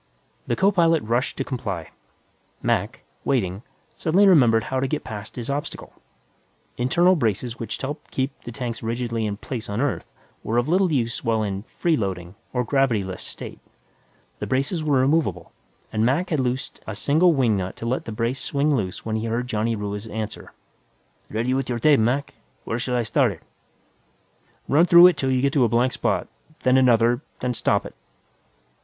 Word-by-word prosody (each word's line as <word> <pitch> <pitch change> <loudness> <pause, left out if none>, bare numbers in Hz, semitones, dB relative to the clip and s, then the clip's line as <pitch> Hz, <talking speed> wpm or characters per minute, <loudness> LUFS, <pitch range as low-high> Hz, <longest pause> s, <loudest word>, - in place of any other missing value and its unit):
The 120 - +1
co 195 +7 +3
pilot 165 -4 +3
rushed 120 +4 -1
to - - -1
comply. 100 - -5 0.7
Mac, - - -1 0.2
waiting, 100 -7 0 0.3
suddenly 180 +5 +3
remembered 120 - +5
how 130 +2 -2
to 135 - 0
get 150 +3 -2
past 105 -2 -8
his 120 -2 -5
obstacle. 140 +1 -4 0.8
Internal 175 +9 +3
braces 120 - -1
which 115 -2 -4
helped 145 +3 -6
keep 135 +1 -1
the 120 - -8
tanks 115 0 -5
rigidly 115 -1 -2
in 100 -1 -3
place 115 0 -6
on 100 +2 -2
Earth 140 0 -2 0.3
were 115 - -1
of 120 +2 +2
little 180 +2 +3
use 120 -5 -1
while 110 -1 +1
in 100 -2 -3
"freeloading," 95 - -2 0.2
or 125 -1 0
gravity 125 -4 +2
less, 95 -1 -6
state. - - -8 0.8
The - - -4
braces 140 +6 0
were 140 -4 +3
removable, 130 - 0 0.4
and 110 - +1
Mac 145 +10 +1
had 155 - +1
loosened 130 0 -2
a 110 - -4
single 160 - +3
wing 125 -7 +2
nut 95 -1 -3
to - - -7
let 125 +3 -1
the - - -5
brace 115 +4 -2
swing 145 +1 +1
loose 95 -7 -3
when 110 0 -1
he 110 +1 -3
heard 115 +2 -1
Johnny 115 -1 -1
Ruiz's 105 +1 -4
answer. 110 -1 -5 0.8
"Ready 115 +4 -1
with 135 -1 -1
your 120 - -1
tape, 145 +4 +4
Mac. 125 +6 0 0.3
Where 115 - -3
shall 125 0 -2
I 120 - +1
start 130 -2 +2
it?" 80 - -17 1.2
"Run 145 +4 +4
it 175 - +4
through 175 +1 +9
'til 135 - -2
you 130 0 +1
get 140 0 +2
to 140 - +4
a 120 - +3
blank 120 +3 +2
spot, - - -1 0.4
then 130 -1 +4
another, 120 -1 +4 0.2
then 125 -1 -1
stop - - +1
it." - - -8
125 Hz, 185 wpm, -23 LUFS, 110-140 Hz, 1.2 s, through